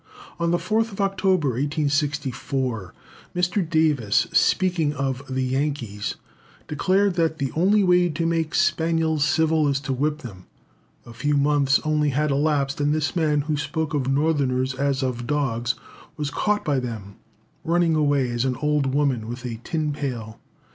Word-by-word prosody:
On 170 0 +1
the 175 - +2
4th 220 +1 -1
October, 190 -5 +1
1864, 135 - -1 0.4
Mr. 180 0 0
Davis, 150 - +2
speaking 175 -6 +2
of 135 -1 -2
"the 130 0 -1
Yankees," 130 -6 -2 0.5
declared 195 +5 +1
that 165 -1 +1
"the 140 -4 -2
only 200 +5 +3
way 180 -1 +4
to 165 +1 -2
make 165 -1 0
spaniels 160 -2 +1
civil 160 0 +2
is 140 -1 +1
to 135 -2 -2
whip 150 +3 -1
them." 95 -7 -10 0.6
A 120 - -11
few 145 +5 0
months 140 -1 +3
only 150 -1 +1
had 150 +2 0
elapsed, 140 -1 0
and 145 +1 +2
this 155 +1 -1
man 150 -3 +2
who 150 +1 -2
spoke 150 +2 -3
of 140 -3 0
Northerners 135 -3 +1
as 135 +1 -1
of 120 -2 -3
dogs, 125 -4 0 0.4
was 150 -1 -3
caught 210 +6 0
by 145 -3 +1
them 110 -5 -7 0.5
running 170 0 +2
away 145 -5 +2
as 120 0 -1
an 130 -1 0
old 145 -1 0
woman 135 -6 +1
with 120 +2 -6
a 115 -2 -5
tin 155 -3 -1
pail. 120 -6 -5
145 Hz, 155 wpm, -23 LUFS, 130-160 Hz, 0.6 s, way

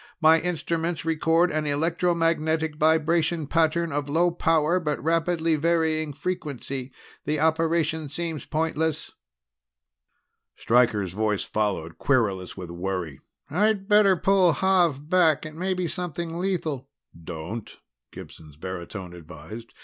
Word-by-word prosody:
My 160 0 +6
instruments 165 0 -2
record 165 +2 +2
an 155 0 -1
electromagnetic 160 0 0
vibration 160 +1 +2
pattern 165 +2 +1
of 145 0 -2
low 170 +4 +2
power 165 0 +2
but 150 -4 -2
rapidly 165 0 +1
varying 160 -1 +1
frequency. 140 -5 -5 0.3
The 150 +1 0
operation 160 -1 +1
seems 160 0 -4
pointless." 160 -1 -1 1.4
Stryker's 110 -6 +2
voice 105 0 0
followed, 100 -6 -2
querulous 100 -10 0
with 90 -3 -7
worry: 85 -5 -4 0.3
"I'd 200 +3 +1
better 205 -2 +5
pull 190 -1 +4
Xav 170 -6 +2
back. 165 -4 +3
It 155 - -7
may 185 +4 -2
be 180 -1 -1
something 170 -2 -4
lethal." 160 -8 -2 0.3
"Don't," 85 +7 -7 0.3
Gibson's 75 -2 -12
baritone 90 +1 -7
advised. 85 +7 -10
155 Hz, 115 wpm, -25 LUFS, 125-170 Hz, 1.4 s, My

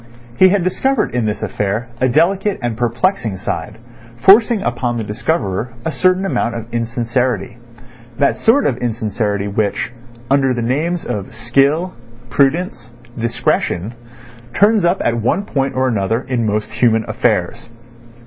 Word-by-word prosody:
He 185 - +8
had 195 -1 +2
discovered 265 +9 0
in 120 -2 0
this 105 - -3
affair 105 +4 -2
a 130 - +2
delicate 190 +8 +2
and 120 -2 -1
perplexing 120 - 0
side, 90 +3 -4 0.4
forcing 210 - +5
upon 120 0 -1
the 115 - -2
discoverer 110 - -2
a 160 - 0
certain 185 +6 +2
amount 120 -11 -1
of 115 -1 -5
insincerity—that 120 +1 -2
sort 275 +6 +3
of 125 - +1
insincerity 110 -3 -2
which, 100 +2 -1 0.3
under 135 -1 +2
the 120 - -2
names 160 +8 -1
of 100 +1 -5
skill, 140 +10 +1 0.4
prudence, 135 -4 0 0.2
discretion, 115 -3 -1 0.6
turns 205 -2 +4
up 175 +2 +1
at 120 -1 +1
one 190 - 0
point 135 -5 -1
or 130 0 +1
another 115 0 0
in 125 -4 -1
most 105 +1 -1
human 110 -1 +2
affairs. - - -1
120 Hz, 140 wpm, -17 LUFS, 115-160 Hz, 0.6 s, He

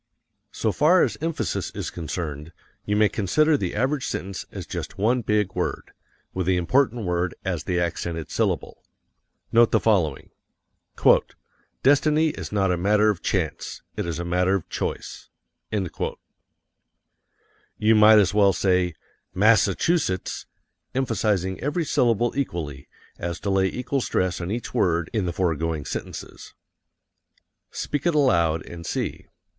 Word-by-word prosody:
So - - -1
far 170 +5 +4
as - - 0
emphasis 165 0 -2
is - - -4
concerned, 80 -1 -5 0.3
you 105 - 0
may 105 0 +5
consider 150 - +2
the 95 -10 -2
average 130 +5 0
sentence 95 +1 -5
as - - -7
just - - -6
one 120 +5 +2
big 105 -3 0
word, - - -3 0.4
with 95 -2 -2
the 95 -1 +3
important 120 +4 +1
word 90 -1 -1
as - - -2
the 90 -1 0
accented 85 -2 -3
syllable. - - -1 0.7
Note 115 0 +5
the - - +4
following: 90 -11 +1 1.5
"Destiny 150 +3 +4
is 150 - -6
not 95 -3 +1
a 90 - +1
matter 105 +4 +3
of 95 - -6
chance. 90 -5 -2
It - - -3
is 85 -3 -3
a 85 - -4
matter 90 +2 +2
of 95 - -3
choice." - - -5 0.4
You 105 +2 -6
might 110 0 +7
as 100 -2 +4
well 100 -2 +4
say 90 -2 +1 0.4
MASS 110 +3 +5
A 100 - -1
CHU 175 +1 +2
SETTS, 95 - -3 0.5
emphasizing 105 -7 0
every 150 +5 -1
syllable 120 -3 +2
equally, 80 - -4 0.3
as 85 -1 -4
to 100 - -1
lay 95 0 +3
equal 125 +6 -2
stress 90 -5 -1
on 85 - -4
each 115 +3 -4
word 85 -3 +1
in 105 -5 0
the - - 0
foregoing 80 -4 -1
sentences. - - -7 1.1
Speak 145 +3 -3
it 170 - +2
aloud 85 - +2
and 85 -1 -9
see. - - -4
95 Hz, 145 wpm, -24 LUFS, 85-120 Hz, 1.5 s, might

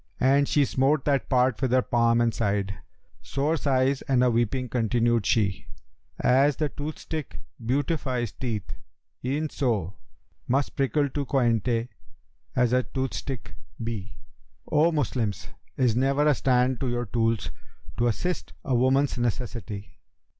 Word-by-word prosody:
And 140 +2 +4
she 145 -2 +3
smote 135 +2 +1
that 140 -2 +1
part 125 -2 +2
with 130 -3 +1
her 130 -1 +4
palm 115 0 +2
and 115 -1 +2
sighed 100 -2 -1 0.3
* - - -37
Sore 145 +4 +1
sighs 135 -2 +1
and 130 -2 +3
a 125 - +4
weeping 120 +2 0
continued 120 -2 +1
she, 100 -6 +1 0.5
'As 135 +3 +4
the 150 -1 -1
toothstick 155 0 -6 0.3
beautifies 130 - -1
teeth 115 -6 -4 0.5
e'en 145 +4 -1
so 110 - -1 0.3
* - - -42
Must 135 +3 0
prickle 140 +2 +1
to 140 +1 -3
coynte 120 -2 +1 0.7
as 125 -1 +2
a 125 - +4
toothstick 130 -1 -4 0.3
be. 110 -3 -5 0.5
O 160 +3 +4
Moslems, 120 - -1 0.3
is 125 -4 +2
never 135 +3 +2
a 150 - +5
stand 125 -1 +2
to 130 - -1
your 120 0 -1
tools, 115 +1 0 0.2
* - - -19
To 120 - +2
assist 175 +10 -2
a 130 - 0
woman's 130 +2 +2
necessity?' 115 -3 -4
125 Hz, 145 wpm, -26 LUFS, 115-140 Hz, 0.7 s, a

